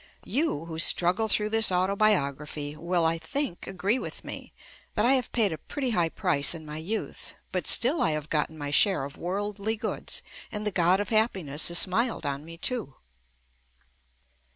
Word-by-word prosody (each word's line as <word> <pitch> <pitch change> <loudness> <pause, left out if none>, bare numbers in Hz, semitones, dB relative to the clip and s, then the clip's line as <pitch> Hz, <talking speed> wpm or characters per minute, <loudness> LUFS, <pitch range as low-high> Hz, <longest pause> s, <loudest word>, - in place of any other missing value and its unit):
You, 270 - -1
who 160 -1 -6
struggle 180 +6 +5
through 210 0 +1
this 225 -2 +5
autobiography, 155 -7 0
will, 170 +1 0
I 165 0 +1
think, 235 - -3
agree 195 +6 0
with - - -7
me - - -8 0.4
that 210 - +2
I 255 - +5
have 255 -3 0
paid 215 -7 +2
a 155 - -7
pretty 270 -4 -3
high 175 -6 +1
price 165 -4 +1
in 160 -1 -9
my 150 0 -7
youth, 195 +8 -5 0.2
but - - -2
still 275 +7 +3
I - - +3
have 155 -1 -3
gotten 155 0 -1
my 145 -1 -5
share 190 0 +4
of 140 +1 -7
worldly 205 +4 -3
goods 215 - -3 0.3
and 210 0 -4
the 210 - 0
God 180 +1 +3
of 205 - -3
Happiness 190 -10 +1
has 170 - +2
smiled 225 +7 +2
on 140 0 -3
me 165 +1 -10
too. 220 - -1
180 Hz, 175 wpm, -27 LUFS, 160-215 Hz, 0.4 s, struggle